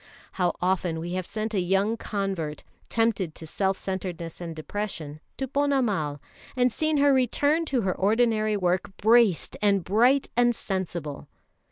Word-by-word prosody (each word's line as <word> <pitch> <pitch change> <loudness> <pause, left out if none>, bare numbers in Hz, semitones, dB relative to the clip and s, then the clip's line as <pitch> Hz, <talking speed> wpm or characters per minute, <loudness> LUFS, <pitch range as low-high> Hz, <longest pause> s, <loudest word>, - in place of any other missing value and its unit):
How 180 -2 0
often 180 -3 0
we 170 +2 -4
have 185 -1 -3
sent 220 0 -3
a 200 - +1
young 195 +5 +1
convert, 195 -9 -3 0.3
tempted 220 -8 0
to 160 - -8
self 190 +4 0
centredness 180 -3 -5
and 165 -2 -5
depression, 155 -3 -5 0.2
to 270 - -2
Ponnamal, 245 - 0 0.4
and 250 -2 +2
seen 310 -1 +1
her 285 0 +5
return 285 +5 +2
to 270 -5 0
her 190 -3 0
ordinary 215 +1 +2
work 185 +1 -1
braced 220 -4 +3
and 200 -3 +3
bright 245 +9 +3
and 240 0 +3
sensible. 175 -8 -4
200 Hz, 150 wpm, -26 LUFS, 175-235 Hz, 0.4 s, her